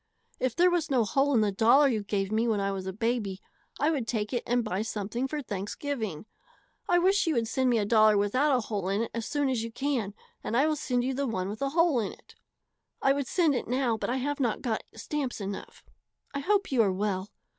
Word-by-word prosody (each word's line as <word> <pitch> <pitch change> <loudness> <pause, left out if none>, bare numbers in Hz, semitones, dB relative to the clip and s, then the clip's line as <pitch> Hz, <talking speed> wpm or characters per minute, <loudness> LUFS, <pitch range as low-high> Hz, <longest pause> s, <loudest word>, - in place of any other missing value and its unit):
If 255 -2 -1
there 355 +1 +4
was 340 -3 0
no 255 -4 +3
hole 275 +7 +1
in 225 - +4
the 210 -1 +2
dollar 235 +8 +5
you 225 -5 0
gave 200 -1 -2
me 225 +2 +1
when 220 -3 +1
I 200 0 0
was 190 -1 -4
a - - -2
baby 215 -2 -2 0.4
I 300 +3 +3
would 265 -8 -2
take 215 0 -2
it 245 - 0
and 245 0 +2
buy 205 -3 -2
something 220 +3 -3
for 295 +1 -4
Thanksgiving. 210 - -4 0.6
I 350 - +5
wish 385 +2 +3
you 320 - +2
would 230 -1 +1
send 260 +3 +1
me 240 - +3
a 210 - +1
dollar 215 -1 +5
without 255 +8 +2
a - - -1
hole 205 -4 -3
in 200 +3 +1
it 230 - -6
as 230 -1 -3
soon 290 -1 0
as 250 -4 0
you 230 - -5
can 240 -6 -2 0.3
and 230 - -1
I 275 - +4
will 310 0 +1
send 250 -4 -1
you 265 +1 -1
the 275 +1 -1
one 190 -5 -2
with 210 +4 -7
a 275 - +1
hole 330 -3 +3
in 210 - -2
it. - - -19 0.7
I 270 - +3
would 280 -2 -2
send 330 -5 +2
it 250 - -2
now 250 -2 +1
but 220 - -3
I 255 - 0
have 290 +3 -2
not 240 -5 0
got 230 -4 -1
stamps 265 +3 -3
enough. 200 -1 -7 0.5
I 280 - -2
hope 395 +5 +1
you 255 -3 +4
are 200 -3 +3
well. 190 0 -2
235 Hz, 245 wpm, -28 LUFS, 210-280 Hz, 0.7 s, dollar